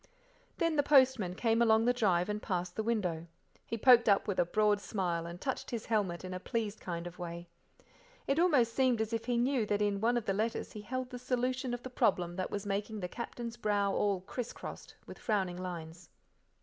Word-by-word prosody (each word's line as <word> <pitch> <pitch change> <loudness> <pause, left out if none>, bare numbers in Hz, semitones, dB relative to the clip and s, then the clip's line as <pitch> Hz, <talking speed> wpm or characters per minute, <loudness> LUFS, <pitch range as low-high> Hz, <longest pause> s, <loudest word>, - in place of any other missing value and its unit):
Then 330 -2 +1
the - - +6
postman 260 -10 +4
came 225 +2 +2
along 225 -1 +4
the 245 - +4
drive 190 -7 +2
and 210 0 -3
past 180 -3 -3
the - - -1
window. 185 -8 -1 0.4
He 230 - -3
poked 240 -1 +6
up 200 - +3
with 200 - -1
a - - +4
broad 210 +2 +2
smile, 175 -6 -2
and 170 +1 -8
touched 265 +6 -3
his 235 -3 -4
helmet 195 -6 -1
in 185 - -5
a 185 - -4
pleased 220 +1 -3
kind 170 -1 -5
of 175 +1 -9
way. 170 0 -6 0.8
If 275 +3 +1
almost 280 -10 +4
seemed 255 -3 +2
as 220 +1 -1
if 225 - -2
he 245 -1 0
knew 250 0 +2
that 205 0 +1
in 205 -1 0
one 240 +2 +3
of 235 - -2
the 195 - +1
letters 220 +3 -2
he 210 - -8
held 255 +4 -4
the 250 - -6
solution 255 0 -1
of 245 0 -4
the 255 - -7
problem 175 -7 +1
that 185 - -2
was 205 0 -4
making 205 +2 -2
the 180 - -3
Captain's 235 +2 -6
brow 205 -3 +1
all 200 -3 +1
criss 235 +5 -5
crossed - - -9
with - - -11
frowning 190 -5 0
lines. 170 -1 -7
215 Hz, 215 wpm, -32 LUFS, 185-240 Hz, 0.8 s, the